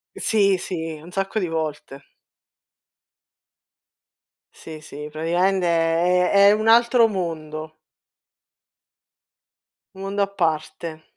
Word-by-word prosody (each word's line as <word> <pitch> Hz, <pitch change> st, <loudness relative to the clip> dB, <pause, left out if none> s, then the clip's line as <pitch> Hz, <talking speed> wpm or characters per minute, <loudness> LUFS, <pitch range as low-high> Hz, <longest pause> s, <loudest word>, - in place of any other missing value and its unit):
Sì, 200 Hz, -3 st, +2 dB
sì, 165 Hz, -3 st, -5 dB
un 165 Hz, +4 st, -13 dB
sacco 195 Hz, +3 st, -3 dB
di 190 Hz, -4 st, 0 dB
volte. 155 Hz, -3 st, -5 dB, 2.5 s
Sì, 155 Hz, -1 st, -11 dB
sì, 150 Hz, -1 st, -9 dB
praticamente 175 Hz, +4 st, 0 dB
è 170 Hz, +2 st, +2 dB
è 200 Hz, 0 st, +6 dB
è -, -, +6 dB
un 215 Hz, +1 st, 0 dB
altro 235 Hz, +1 st, +5 dB
mondo. 160 Hz, -5 st, -5 dB, 2.2 s
Un -, -, -13 dB
mondo 195 Hz, +1 st, -3 dB
a -, -, -1 dB
parte. 160 Hz, -3 st, -3 dB
175 Hz, 100 wpm, -22 LUFS, 160-195 Hz, 2.5 s, è